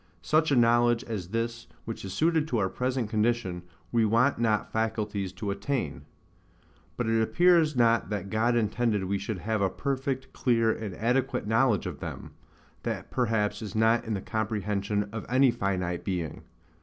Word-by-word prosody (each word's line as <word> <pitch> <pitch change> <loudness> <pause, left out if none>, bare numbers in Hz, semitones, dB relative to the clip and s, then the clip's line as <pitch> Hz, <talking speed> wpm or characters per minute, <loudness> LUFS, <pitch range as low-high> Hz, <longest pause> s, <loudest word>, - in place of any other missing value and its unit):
Such 155 - +2
a 140 - +3
knowledge 120 0 +4
as 105 -8 -5
this 115 +3 -3 0.2
which 115 - -6
is 95 - -5
suited 160 - +2
to 125 - -1
our 95 -3 +1
present 125 0 -1
condition, 110 -4 0 0.3
we 115 -1 +3
want 115 +5 +3
not 110 -3 +1
faculties 105 -3 -1
to 100 +2 -3
attain. 130 +7 -3 0.9
But 120 - -1
it 115 0 +2
appears 170 +4 +4
not 115 -1 +3
that 100 -2 -4
God 115 +2 +2
intended 110 -2 +1
we 100 +1 -1
should 100 +1 -4
have 110 +3 -2
a 95 - +3
perfect, 135 - -3
clear, 115 -3 +2
and 110 -4 -5
adequate 125 +3 0
knowledge 110 -1 +2
of - - -5
them: - - -7 0.5
that - - -4
perhaps 105 -4 0
is 105 -3 -6
not 110 +1 +3
in 110 -2 -2
the 95 - -3
comprehension 105 -1 -1
of 110 -1 -5
any 130 +1 +5
finite 90 -5 -2
being. 90 -5 -4
110 Hz, 170 wpm, -28 LUFS, 105-120 Hz, 0.9 s, any